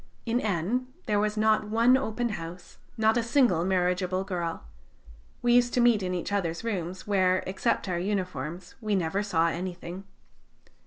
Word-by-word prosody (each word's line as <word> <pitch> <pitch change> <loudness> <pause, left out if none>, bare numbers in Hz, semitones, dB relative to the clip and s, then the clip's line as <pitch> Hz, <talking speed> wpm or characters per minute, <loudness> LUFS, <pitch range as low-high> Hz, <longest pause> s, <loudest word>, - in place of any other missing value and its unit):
In 235 +1 +1
N 215 +6 -1 0.2
there 210 -3 +1
was 210 +1 0
not 215 0 +3
one 230 +4 +5
open 240 -2 -1
house, 175 -3 -8 0.2
not 220 +1 +3
a - - +3
single 235 - +3
marriageable 185 0 +1
girl. 175 - -3 0.8
We 240 0 +4
used 245 0 +4
to - - +2
meet 240 -3 +4
in 180 -1 -2
each 175 - -3
other's 175 -2 -1
rooms, 185 -5 -3
where, 185 -2 +2
except 195 +3 -1
our 175 -2 -1
uniforms, 180 -3 -3
we 215 -2 0
never 190 +2 0
saw 170 -5 +2
anything. 180 +1 -5
195 Hz, 160 wpm, -28 LUFS, 180-220 Hz, 0.8 s, one